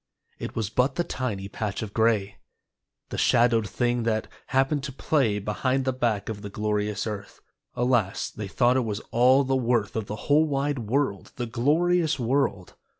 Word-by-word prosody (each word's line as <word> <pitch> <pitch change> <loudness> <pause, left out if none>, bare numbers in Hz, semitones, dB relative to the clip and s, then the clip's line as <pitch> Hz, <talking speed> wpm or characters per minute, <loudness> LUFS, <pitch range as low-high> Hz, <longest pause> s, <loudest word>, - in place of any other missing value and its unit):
It - - -6
was 110 -2 -2
but 125 +3 +1
the 175 - +1
tiny 105 - -3
patch 105 0 -4
of 105 -2 -7
gray, 110 -3 +1 0.7
The - - -4
shadowed 115 -3 +3
thing 120 -1 0
that 110 -1 0 0.2
happened 135 +2 +1
to 140 - -5
play 130 -5 +1
Behind 130 +6 -1
the 130 - +1
back 115 -5 -1
of 105 -2 -5
the 100 - -6
glorious 105 0 -1
earth. 105 -2 -6 0.4
Alas, 120 -5 +1
they 105 -2 -6
thought 125 +5 +2
it - - +4
was 105 -2 -3
all 130 +4 +5
the 135 0 0
worth 120 -4 0
Of 110 -2 -2
the 105 - -4
whole 150 +2 +4
wide 140 -1 -1
world, 115 -2 -1
the 120 - -3
glorious 155 +8 +2
world. 120 -7 0
120 Hz, 175 wpm, -26 LUFS, 105-135 Hz, 0.7 s, all